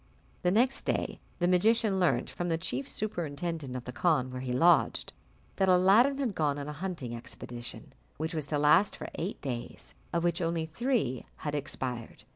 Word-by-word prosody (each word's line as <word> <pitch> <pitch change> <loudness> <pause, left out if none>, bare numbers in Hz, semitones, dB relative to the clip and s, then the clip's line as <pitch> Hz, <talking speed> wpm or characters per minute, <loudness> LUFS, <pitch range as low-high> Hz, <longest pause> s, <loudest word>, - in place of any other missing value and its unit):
The 180 - +2
next 245 +8 +3
day - - -1 0.2
the 175 - +1
magician 205 +2 +3
learnt, 180 - +2
from 175 0 -4
the 165 - +1
chief 135 -4 -3
superintendent 165 -7 -3
of 125 - -4
the 125 - -6
khan 130 -1 +1
where 125 0 -5
he 130 -1 -3
lodged, 170 +8 +3 0.4
that 190 -1 +3
Aladdin 200 +10 +5
had 260 -7 -1
gone 150 -4 +1
on 140 0 -5
a 150 - -4
hunting 150 -7 -4
expedition, 120 0 -9 0.2
which 160 +3 -3
was 155 -3 -2
to 150 - 0
last 150 +7 +4
for - - -7
eight 180 +6 -4
days, 120 -4 -6 0.2
of 170 0 0
which 175 +1 +1
only 165 -1 0
three 170 - -1
had 150 - -4
expired. 130 -6 -4
165 Hz, 180 wpm, -30 LUFS, 135-185 Hz, 0.4 s, Aladdin